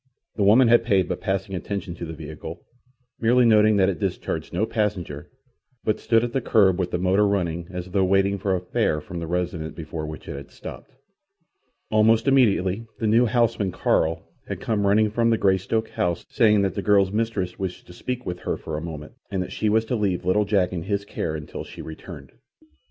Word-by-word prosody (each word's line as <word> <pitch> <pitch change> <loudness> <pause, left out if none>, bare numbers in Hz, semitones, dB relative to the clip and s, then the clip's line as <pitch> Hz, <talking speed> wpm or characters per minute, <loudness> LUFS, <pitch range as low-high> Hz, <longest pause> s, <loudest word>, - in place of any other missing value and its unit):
The - - -3
woman 110 +6 +6
had 120 0 +5
paid 100 -5 +2
but - - -4
passing 95 0 -2
attention 100 0 -4
to 85 0 -6
the 80 - -6
vehicle, 80 +2 -8 0.5
merely 120 +2 +4
noting 110 -1 +5
that 95 -1 +4
it 95 -5 -1
discharged - - -3
no 95 +5 0
passenger, 95 -10 -3 0.5
but 110 - 0
stood 115 -1 +2
at 120 -1 -3
the 135 - 0
kerb 100 -6 +3
with 90 -1 0
the - - -1
motor 95 +3 +3
running 85 -4 -1
as 90 0 -6
though 95 0 +2
waiting 95 +1 +2
for 95 0 0
a - - -1
fare 85 -3 0
from 85 +3 -7
the 85 - -5
residence 85 -2 -3
before 80 -1 -5
which 75 0 -8
it - - -5
had 70 0 -9
stopped. - - -10 1.0
Almost 110 +2 +4
immediately 115 -5 +3
the 115 - -3
new 115 +3 +4
houseman, 115 -5 +1
Carl, 80 -1 0 0.2
had - - -4
come 105 -3 0
running 105 +1 +3
from 115 +1 +2
the 115 - +3
Greystoke 100 +3 +1
house, 85 -1 -2
saying 105 -5 +4
that 100 - 0
the 100 - -3
girl's 100 -1 +3
mistress 105 -5 -2
wished 95 -2 -4
to 90 - -13
speak 125 +6 -5
with 90 0 -4
her - - -2
for 80 -1 -5
a - - -4
moment, 75 -2 -7 0.2
and 95 -3 -1
that - - -9
she 110 - 0
was 110 +1 +2
to 125 - -1
leave 95 -5 -1
little 105 +3 +2
Jack 95 -3 +1
in 85 - -3
his 100 +3 -2
care 80 -5 -3
until 75 -1 -6
she - - -12
returned. 80 -3 -10
95 Hz, 210 wpm, -24 LUFS, 90-110 Hz, 1.0 s, woman